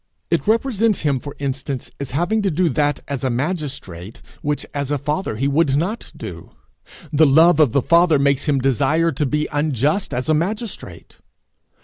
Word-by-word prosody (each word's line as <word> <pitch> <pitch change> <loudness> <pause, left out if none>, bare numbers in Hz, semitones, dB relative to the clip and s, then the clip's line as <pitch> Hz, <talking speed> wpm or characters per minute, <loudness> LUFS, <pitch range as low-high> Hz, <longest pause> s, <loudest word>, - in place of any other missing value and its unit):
It - - 0
represents 225 -2 +1
him, 140 -3 +1
for 145 +2 -9
instance, 135 -1 -4
as 140 -2 -4
having 175 - 0
to 200 - +1
do 175 +1 +1
that 145 +1 0
as 140 -2 -4
a 130 - +1
magistrate 125 - -4 0.2
which 150 0 -2
as 140 -1 -3
a 145 - 0
father 150 - -2
he 135 +5 0
would 140 -1 +2
not 190 +11 -2
do! - - -9 0.6
The 155 +1 +5
love 160 +4 +5
of 150 -7 +5
the 140 0 +1
father 170 -2 +4
makes 140 -1 +1
him 145 -3 +2
desire 140 +5 +2
to 150 - -1
be 150 +3 -1
unjust 145 - 0
as 125 -1 -3
a 155 - +3
magistrate! 210 +8 -4
145 Hz, 175 wpm, -20 LUFS, 135-170 Hz, 0.6 s, The